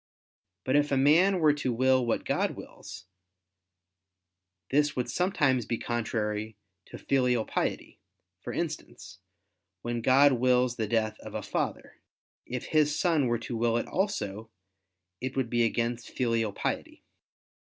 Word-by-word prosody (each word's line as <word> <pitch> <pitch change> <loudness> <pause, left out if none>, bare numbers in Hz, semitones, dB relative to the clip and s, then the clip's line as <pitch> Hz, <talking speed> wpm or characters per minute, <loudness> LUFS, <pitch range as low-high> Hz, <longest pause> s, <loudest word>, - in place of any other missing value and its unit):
But 130 - 0
if 145 0 +3
man 155 +8 +4
were 155 -3 +5
to 145 -3 -2
will 130 +2 +3
what 115 -1 -1
God - - 0
wills, - - -10 1.7
this 145 +1 +2
would 125 - -1
sometimes 145 - +1
be 115 - -1
contrary 110 -2 -3 0.3
to - - -9
filial 125 -4 +1
piety: - - -3 0.4
for - - -6
instance, 95 0 -5 0.6
when 120 0 -2
God 135 +4 +5
wills 125 0 +2
the 110 -2 -1
death 110 -1 0
of - - -10
a - - -3
father: - - -3 0.5
if 125 0 -4
his 150 -1 +2
son 160 -7 +2
were 120 0 +1
to 120 +1 -6
will 115 0 +1
it - - -1
also, 110 - -2 0.7
it 130 +1 -5
would 130 -3 -1
be 120 -1 +3
against 115 +1 -1
filial 115 -3 0
piety. - - -4
125 Hz, 140 wpm, -28 LUFS, 115-140 Hz, 1.7 s, were